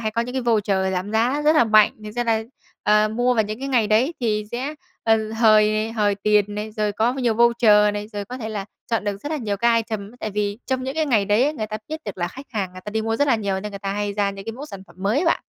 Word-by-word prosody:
hay 220 -1 -1
có 230 - -1
những 250 +2 -7
cái 260 - -1
voucher 200 -5 +1
giảm 185 +3 -3
giá 250 +7 +1
rất 305 +1 +4
là 270 - +6
mạnh. 215 -1 +5
Thực 210 - -6
ra 240 +2 -2
là, 225 -1 +1 0.4
ờ, 210 0 +4
mua 245 +3 +1
vào 220 - +3
những 215 +2 -5
cái 275 +1 -4
ngày 240 -5 +2
đấy 240 +10 +2
thì 215 -3 0
sẽ, 265 +5 -3 0.3
ờ, 220 -1 +2
hời 215 -1 +3
hời 205 -3 +1
tiền 205 0 +1
này, 210 +1 -4
rồi 210 -1 -1
có 225 +4 +1
nhiều 245 -4 0
voucher 220 -3 +4
này, 205 +1 -5
rồi 205 -1 -4
có 250 +5 -8
thể 220 -3 -5
là 205 -3 -4 0.3
chọn 225 -2 0
được 205 -1 -2
rất 290 - -4
là 310 - 0
nhiều 210 -6 -2
cái 235 +2 +3
item. 220 -3 -3
Tại 215 - -3
vì 205 +1 -2
trong 260 -1 -1
những 265 +1 -4
cái 315 -1 0
ngày 220 -7 +2
đấy 210 +4 +3
ấy, 295 - +1
người 215 -6 -3
ta 215 - -4
biết 315 +1 -5
được 205 -3 -6
là 175 - -1
khách 270 +2 -11
hàng 195 -5 -3
người 185 - -10
ta 210 - -5
đi 220 0 -1
mua 225 0 -1
rất 285 0 +1
là 235 - +4
nhiều, 195 -3 -2
nên 210 +1 -6
người 200 - -6
ta 195 0 -3
hay 205 0 -2
ra 200 -1 0
những 195 0 -9
cái 225 - -4
mẫu 280 +6 -8
sản 195 -8 -9
phẩm 175 - -20
mới 205 +8 +1
ấy 345 - 0
bạn. 330 - +2
215 Hz, 300 wpm, -22 LUFS, 205-240 Hz, 0.4 s, là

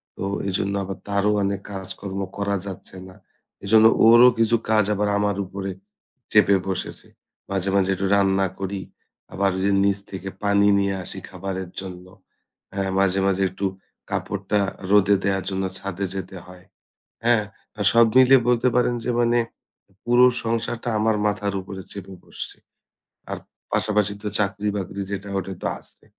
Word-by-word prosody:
তো - - -6 0.2
এজন্য 95 +1 -1
আবার 95 +1 -5
তারও 100 +1 +1
অনেক 100 0 -1
কাজকর্ম 95 0 -6 0.2
করা 100 0 0
যাচ্ছে 95 0 -9
না। 95 - -14 0.5
এজন্য 110 +2 +5 0.2
ওরও 120 +2 +9
কিছু 115 +1 +4
কাজ 110 -2 +4
আবার 105 0 0
আমার 100 -1 0
উপরে 95 +1 -5 0.6
চেপে 100 -2 +5
বসেছে। 95 - -5 0.4
মাঝে, 95 0 -1
মাঝে 95 -1 +2
একটু 95 - -2
রান্না 95 -1 +3
করি। 95 0 -3 0.5
আবার 100 0 +1 0.3
নিচ 100 0 +2
থেকে 95 0 -5
পানি 100 0 +4
নিয়ে 100 0 +1
আসি 95 - -8
খাবারের 95 -1 -5
জন্য। 90 -1 -8 0.7
হ্যাঁ, 95 -1 -1
মাঝে 95 0 +2
মাঝে 95 0 +1
একটু 95 +2 -4 0.4
কাপড়টা 105 - -1 0.3
রোদে 100 0 +5
দেয়ার 95 -2 0
জন্য 95 0 -2
ছাদে 100 0 -4
যেতে 95 0 -6
হয়। 90 0 -14 0.6
হ্যাঁ? 115 -2 +4 0.5
সব 115 0 +6
মিলিয়ে 130 0 +7
বলতে 125 +1 +3
পারেন 125 0 +2
যে - - -1
মানে 120 0 +3 0.7
পুরো 120 +1 +5 0.2
সংসারটা 115 +1 -2
আমার 110 0 +2
মাথার 105 -1 -1
উপরে 95 0 -8
চেপে 95 -1 -8
বসছে। - - -8 0.7
আর - - -3 0.3
পাশাপাশি 105 -1 +1
তো 105 - -2
চাকরি 105 0 -1
বাকরি 100 0 -4
যেটা 100 0 -4
ওটা 95 0 -4
তো - - -2
আছে। - - -17
100 Hz, 150 wpm, -23 LUFS, 95-105 Hz, 0.7 s, ওরও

